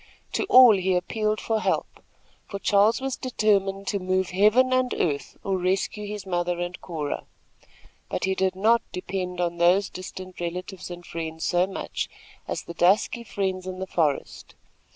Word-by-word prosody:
To -, -, -1 dB
all 255 Hz, -, +8 dB
he 185 Hz, 0 st, +1 dB
appealed 215 Hz, +4 st, -1 dB
for 225 Hz, -1 st, 0 dB
help, -, -, -2 dB, 0.5 s
for 200 Hz, -, -5 dB
Charles 205 Hz, +3 st, +3 dB
was 270 Hz, -1 st, -2 dB
determined 200 Hz, -5 st, +1 dB
to 200 Hz, -, 0 dB
move 185 Hz, 0 st, 0 dB
heaven 215 Hz, +7 st, +4 dB
and 255 Hz, -1 st, +2 dB
earth 145 Hz, -4 st, -2 dB
or 190 Hz, -1 st, 0 dB
rescue 190 Hz, +3 st, -1 dB
his 205 Hz, -1 st, -6 dB
mother 175 Hz, -1 st, -1 dB
and 175 Hz, 0 st, -4 dB
Cora; 155 Hz, -5 st, -4 dB, 0.8 s
but -, -, -3 dB
he 190 Hz, -, +1 dB
did 190 Hz, -1 st, 0 dB
not 225 Hz, +5 st, +4 dB
depend 180 Hz, -1 st, -4 dB
on 170 Hz, -1 st, -1 dB
those 185 Hz, +3 st, +4 dB
distant 185 Hz, 0 st, -8 dB
relatives 180 Hz, +2 st, -5 dB
and 175 Hz, 0 st, -8 dB
friends 160 Hz, -1 st, -5 dB
so 180 Hz, +1 st, +2 dB
much 195 Hz, -, -4 dB, 0.4 s
as -, -, -3 dB
the 170 Hz, -, -8 dB
dusky 195 Hz, +7 st, +2 dB
friends 190 Hz, -4 st, -3 dB
in 185 Hz, 0 st, -5 dB
the 190 Hz, -, -4 dB
forest. 155 Hz, -6 st, -2 dB
190 Hz, 165 wpm, -25 LUFS, 180-210 Hz, 0.8 s, all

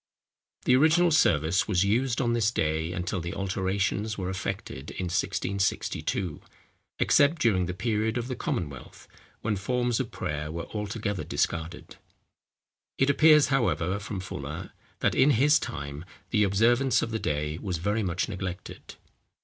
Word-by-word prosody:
The 125 Hz, -, +5 dB
original 165 Hz, +5 st, +4 dB
service 85 Hz, -, +3 dB
was 95 Hz, -3 st, +2 dB
used 120 Hz, +4 st, +1 dB
on 120 Hz, -2 st, +1 dB
this 115 Hz, -2 st, +2 dB
day 80 Hz, -5 st, -1 dB
until 90 Hz, +1 st, -3 dB
the 85 Hz, +3 st, -5 dB
alterations 100 Hz, +2 st, -1 dB
were 95 Hz, -1 st, -3 dB
effected 75 Hz, -6 st, -5 dB
in -, -, -5 dB
1662, 95 Hz, -2 st, -1 dB, 0.6 s
except 145 Hz, +3 st, +4 dB
during 95 Hz, -9 st, +2 dB
the 90 Hz, -, -4 dB
period 110 Hz, +2 st, 0 dB
of 120 Hz, 0 st, -3 dB
the 130 Hz, -, -3 dB
Commonwealth, 75 Hz, -, -5 dB, 0.3 s
when 105 Hz, -1 st, 0 dB
forms 120 Hz, +4 st, 0 dB
of -, -, -2 dB
prayer 75 Hz, +1 st, -4 dB
were 85 Hz, +1 st, -5 dB
altogether 105 Hz, -1 st, -3 dB
discarded. 80 Hz, -1 st, -3 dB, 1.0 s
It 135 Hz, +1 st, +3 dB
appears, 150 Hz, -1 st, +6 dB
however, 100 Hz, -8 st, +1 dB
from 105 Hz, -1 st, -5 dB
Fuller, 95 Hz, -, -6 dB, 0.3 s
that -, -, +2 dB
in 135 Hz, +2 st, +4 dB
his 150 Hz, +4 st, +5 dB
time, 70 Hz, -, -6 dB, 0.3 s
the 105 Hz, -2 st, +3 dB
observance 120 Hz, +6 st, +3 dB
of 115 Hz, -, -3 dB
the 110 Hz, -, -2 dB
day 75 Hz, 0 st, -2 dB
was 90 Hz, -4 st, -3 dB
very 105 Hz, +7 st, 0 dB
much 90 Hz, -3 st, -1 dB
neglected. 95 Hz, -3 st, -7 dB
100 Hz, 145 wpm, -27 LUFS, 90-120 Hz, 1.0 s, appears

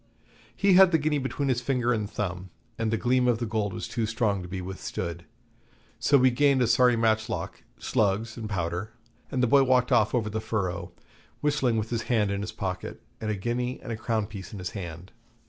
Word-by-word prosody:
He 200 Hz, -1 st, +3 dB
had 190 Hz, 0 st, +8 dB
the 165 Hz, -, +5 dB
guinea 150 Hz, -1 st, 0 dB
between 135 Hz, +1 st, -2 dB
his 125 Hz, -2 st, +1 dB
finger 125 Hz, -1 st, +1 dB
and 105 Hz, -3 st, -2 dB
thumb, 90 Hz, -3 st, -4 dB, 0.3 s
and 115 Hz, -1 st, 0 dB
the 115 Hz, -, +1 dB
gleam 125 Hz, +2 st, +2 dB
of 120 Hz, -2 st, +3 dB
the 120 Hz, -, -2 dB
gold 105 Hz, -2 st, -1 dB
was -, -, -5 dB
too 110 Hz, 0 st, -2 dB
strong 105 Hz, -3 st, 0 dB
to 90 Hz, -, -7 dB
be 95 Hz, +1 st, -5 dB
withstood. 90 Hz, -2 st, -5 dB, 0.7 s
So 145 Hz, -, +4 dB
we 130 Hz, -1 st, +5 dB
gained 135 Hz, 0 st, +3 dB
a -, -, +3 dB
sorry 120 Hz, +2 st, +4 dB
matchlock, 110 Hz, 0 st, -1 dB, 0.2 s
slugs, 110 Hz, +2 st, 0 dB
and 110 Hz, -3 st, -6 dB
powder, 90 Hz, +2 st, -3 dB, 0.4 s
and 130 Hz, -1 st, 0 dB
the -, -, +4 dB
boy 140 Hz, +4 st, +6 dB
walked 130 Hz, -2 st, +3 dB
off 110 Hz, +1 st, +3 dB
over 115 Hz, -3 st, 0 dB
the 110 Hz, +1 st, -2 dB
furrow, 100 Hz, -5 st, -2 dB, 0.5 s
whistling 140 Hz, -6 st, +1 dB
with 110 Hz, +1 st, -2 dB
his 115 Hz, -2 st, 0 dB
hand 105 Hz, -5 st, +2 dB
in 100 Hz, 0 st, -2 dB
his 105 Hz, -, -4 dB
pocket, 95 Hz, -2 st, -5 dB, 0.2 s
and 110 Hz, -, -2 dB
a 105 Hz, -, 0 dB
guinea 125 Hz, +5 st, -2 dB
and -, -, -7 dB
a -, -, -1 dB
crown 110 Hz, -1 st, -1 dB
piece 100 Hz, -2 st, -9 dB
in 105 Hz, -, -7 dB
his 90 Hz, -2 st, -5 dB
hand. 90 Hz, -2 st, -7 dB
110 Hz, 215 wpm, -27 LUFS, 100-125 Hz, 0.7 s, had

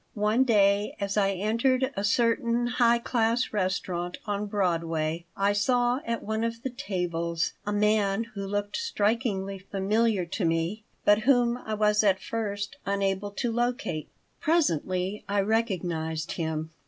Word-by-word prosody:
One 215 Hz, +5 st, +2 dB
day, 205 Hz, -3 st, +3 dB
as 200 Hz, -1 st, -2 dB
I 195 Hz, -2 st, +2 dB
entered 245 Hz, +7 st, +1 dB
a 200 Hz, -, -2 dB
certain 235 Hz, +2 st, +2 dB
high 240 Hz, -1 st, +3 dB
class 235 Hz, 0 st, 0 dB
restaurant 185 Hz, -3 st, -2 dB
on 205 Hz, -1 st, -2 dB
Broadway, 165 Hz, -4 st, -1 dB
I 200 Hz, +1 st, +2 dB
saw 245 Hz, +4 st, +2 dB
at 230 Hz, -1 st, -2 dB
one 220 Hz, +1 st, -2 dB
of 230 Hz, 0 st, -3 dB
the 265 Hz, -, -2 dB
tables 170 Hz, -6 st, -2 dB
a -, -, 0 dB
man 210 Hz, 0 st, +2 dB
who 200 Hz, -2 st, -5 dB
looked 205 Hz, +1 st, -2 dB
strikingly 210 Hz, -, -1 dB
familiar 200 Hz, +1 st, 0 dB
to 190 Hz, +4 st, -4 dB
me, 165 Hz, +6 st, 0 dB, 0.2 s
but 205 Hz, 0 st, +6 dB
whom 240 Hz, 0 st, +3 dB
I 220 Hz, -3 st, -4 dB
was 210 Hz, 0 st, +3 dB
at 195 Hz, -2 st, +3 dB
first 205 Hz, -3 st, -4 dB
unable 195 Hz, 0 st, -1 dB
to 230 Hz, +4 st, -2 dB
locate. 240 Hz, -9 st, -2 dB, 0.3 s
Presently 195 Hz, -, 0 dB
I 200 Hz, 0 st, +2 dB
recognized 175 Hz, -7 st, -1 dB
him. 160 Hz, -1 st, -3 dB
205 Hz, 140 wpm, -27 LUFS, 190-230 Hz, 0.3 s, but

